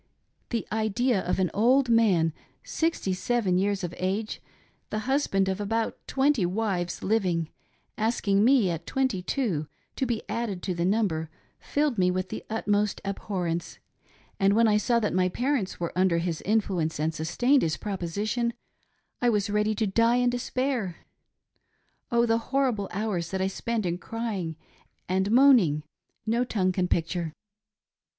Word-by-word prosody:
The 230 -2 -2
idea 220 +1 +1
of 180 - -1
an 185 -2 +1
old 250 +5 +4
man, 200 -9 +3 0.3
sixty 320 - -1
seven 185 -1 +1
years 200 0 0
of 175 - -3
age, 195 +4 -2 0.5
the 215 - -2
husband 260 -8 +1
of 190 +2 -1
about 225 +2 -1
twenty 270 -5 +2
wives 180 -1 -1
living, 180 -6 +1 0.5
asking 210 -2 +2
me, 235 -6 +4
at 165 0 -5
twenty 260 -8 0
two, 185 - -1 0.3
to 265 - 0
be 230 -2 -2
added 210 -6 -3
to 185 - -1
the 170 0 -1
number 185 -6 0 0.3
filled 290 -6 0
me 180 0 +4
with 185 0 -2
the - - -6
utmost 210 -2 0
abhorrence, 180 -4 -3 0.6
and 195 +1 +4
when 230 +1 +5
I 210 -1 +4
saw 235 +3 +2
that 210 - -1
my 185 0 +2
parents 245 -2 -1
were 170 -1 -3
under 180 -2 +3
his 170 -1 -2
influence 185 -7 0
and 160 +1 0
sustained 240 - +2
his 155 -1 0
proposition, 210 +5 -2 0.7
1 245 -1 +3
was 205 -1 0
ready 210 +1 +1
to 220 - 0
die 230 +4 +3
in 245 0 +3
despajr. 245 -5 -2 1.2
Oh! 235 0 +4
the 225 0 +2
horrible 255 -7 +1
hours 195 -5 -2
tuat 190 - -3
I - - +2
spent 220 +2 -2
in 175 0 -1
crying 205 -9 -4 0.5
and 190 +2 +1
moaning, 230 - +5 0.4
no 230 +2 +1
tongue 195 -6 0
can 180 -1 0
picture. 170 -1 -1
205 Hz, 155 wpm, -27 LUFS, 180-235 Hz, 1.2 s, when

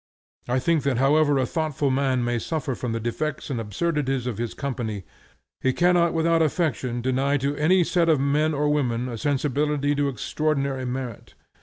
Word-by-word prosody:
I 125 +1 +1
think 155 +4 +2
that 140 -3 0
however 145 +2 +3
a 130 - +2
thoughtful 150 -2 -1
man 130 -2 +1
may 120 0 0
suffer 155 0 -3
from 125 -1 -4
the 115 - -2
defects 130 +6 -3
and 120 -4 -2
absurdities 135 - -1
of 120 -4 -3
his 120 -1 -3
company, 120 -8 -4 0.6
he 130 - +2
cannot 175 0 +3
without 165 0 +2
affectation 140 -6 0
deny 135 +3 +1
to 140 +1 -1
any 175 +5 +3
set 170 0 +1
of 155 -4 +4
men 150 +3 +1
and 145 +1 +1
women 125 -4 0
a 120 - -5
sensibility 145 +1 0
to 145 -1 +1
extraordinary 140 +1 -1
merit. 125 -3 -5
140 Hz, 175 wpm, -24 LUFS, 125-155 Hz, 0.6 s, of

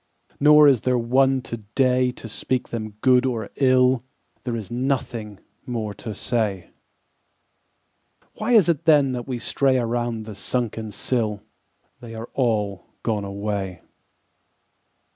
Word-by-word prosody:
Nor 150 +1 +7
is 130 -6 +4
there 125 -1 +1
one 130 +2 +2
today 125 +3 0
To 125 - -8
speak 125 +3 -2
them 110 -3 -5
good 125 -1 +5
or 115 -5 -2
ill: 130 -2 +4 0.4
There 120 -2 -2
is 110 -1 -6
nothing 120 -5 -2 0.3
more 110 -4 -3
to 110 0 -7
say. 105 -6 -2 1.6
Why 220 +3 -1
is 215 -8 +6
it 165 -2 0
then 135 -6 +4
we 130 -2 -2
stray 130 +3 +1
Around 120 -1 -1
the 110 - -7
sunken 110 +2 -3
sill? 105 -2 -2 0.6
They 115 -2 -9
are 115 +1 -7
all 105 -7 -1 0.2
gone 105 -3 -1
away. 100 -2 -4
120 Hz, 125 wpm, -23 LUFS, 110-130 Hz, 1.6 s, Nor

